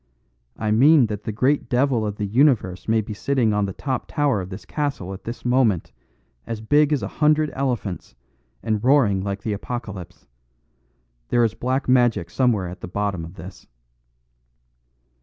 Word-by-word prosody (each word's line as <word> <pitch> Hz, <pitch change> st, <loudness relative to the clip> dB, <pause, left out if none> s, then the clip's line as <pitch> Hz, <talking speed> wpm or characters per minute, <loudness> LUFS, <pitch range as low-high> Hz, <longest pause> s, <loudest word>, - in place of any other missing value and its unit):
"I 110 Hz, -1 st, -1 dB
mean 135 Hz, +5 st, +6 dB
that 105 Hz, -1 st, -5 dB
the -, -, -2 dB
great 130 Hz, +4 st, +1 dB
devil 125 Hz, -3 st, +1 dB
of 105 Hz, -, -4 dB
the 105 Hz, -, -3 dB
universe 105 Hz, -, +2 dB
may 110 Hz, 0 st, +3 dB
be 105 Hz, +1 st, -7 dB
sitting 120 Hz, 0 st, +1 dB
on 105 Hz, -1 st, +1 dB
the 95 Hz, -, -5 dB
top 130 Hz, +3 st, -3 dB
tower 140 Hz, -9 st, +1 dB
of 90 Hz, -, -7 dB
this 95 Hz, +2 st, -9 dB
castle 140 Hz, -, -3 dB
at 95 Hz, -, -11 dB
this 115 Hz, +2 st, -7 dB
moment, 120 Hz, -8 st, +2 dB, 0.6 s
as 115 Hz, -2 st, -4 dB
big 145 Hz, +7 st, +3 dB
as 150 Hz, -, +1 dB
a -, -, -2 dB
hundred 150 Hz, 0 st, +3 dB
elephants, 120 Hz, -, -3 dB, 0.5 s
and 110 Hz, -2 st, -1 dB
roaring 120 Hz, -8 st, +4 dB
like 100 Hz, 0 st, -4 dB
the 110 Hz, -, -1 dB
Apocalypse. 100 Hz, -5 st, -7 dB, 1.0 s
There 120 Hz, -, +3 dB
is 110 Hz, -2 st, +1 dB
black 130 Hz, +4 st, -2 dB
magic 120 Hz, -8 st, +2 dB
somewhere 115 Hz, -8 st, +1 dB
at 90 Hz, +2 st, -9 dB
the -, -, -6 dB
bottom 100 Hz, -2 st, -2 dB
of 85 Hz, +3 st, -10 dB
this." 90 Hz, +4 st, -11 dB
110 Hz, 170 wpm, -22 LUFS, 100-130 Hz, 1.0 s, mean